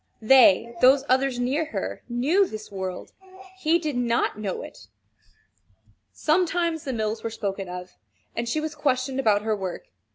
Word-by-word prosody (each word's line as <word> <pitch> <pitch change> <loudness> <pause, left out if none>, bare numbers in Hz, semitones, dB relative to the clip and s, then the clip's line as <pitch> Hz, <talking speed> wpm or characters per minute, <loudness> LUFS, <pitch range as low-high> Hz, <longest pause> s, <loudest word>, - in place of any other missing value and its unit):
They 235 -2 +6
those 265 +2 +6
others 260 -1 +2
near 270 +6 0
her, 315 - -5
knew 295 +12 +2
this 215 -6 -8
world. 190 -2 -5 0.5
He 330 -1 +3
did 310 -5 -3
not 235 -3 0
know 200 -3 -3
it. 100 - -12 1.2
Sometimes 335 0 0
the 270 - -2
mills 220 -1 -2
were 230 - -2
spoken 195 -4 -4
of, 180 0 -7 0.4
and 235 0 -2
she 310 - 0
was 310 0 -4
questioned 270 -3 -1
about 210 -5 +2
her 220 -1 0
work. 195 - -6
245 Hz, 155 wpm, -25 LUFS, 215-300 Hz, 1.2 s, They